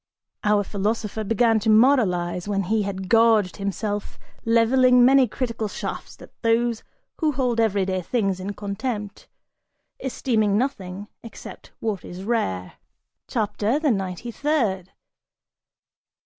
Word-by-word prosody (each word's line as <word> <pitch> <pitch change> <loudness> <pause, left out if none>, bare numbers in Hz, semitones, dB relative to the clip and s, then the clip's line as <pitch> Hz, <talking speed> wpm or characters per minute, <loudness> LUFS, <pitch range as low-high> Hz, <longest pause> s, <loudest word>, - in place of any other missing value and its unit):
(Our 210 -1 +3
philosopher 210 +2 -2
began 225 +1 +2
to 220 +1 -1
moralize, 205 -7 +3
when 200 -1 0
he 215 +4 +1
had 190 -2 -4
gorged 225 -3 +4
himself, 205 +1 -3 0.3
leveling 245 +2 +5
many 265 0 +5
critical 230 -1 -3
shafts - - -6
at - - -14
those 230 0 +1 0.4
who 310 -3 +1
hold 250 -3 0
every 205 -4 +2
day 185 -1 -1
things 195 -1 -1
in 200 +2 -5
contempt, 205 +1 -5 0.7
esteeming 220 -6 0
nothing 205 -6 -3
except 230 - -11
what 215 -4 -2
is 180 +2 -8
rare.) 95 - -2 0.5
CHAPTER 220 +2 0
THE 300 -3 +1
NINETY 195 +2 -3
THIRD. 225 - -1
215 Hz, 120 wpm, -23 LUFS, 195-235 Hz, 0.7 s, leveling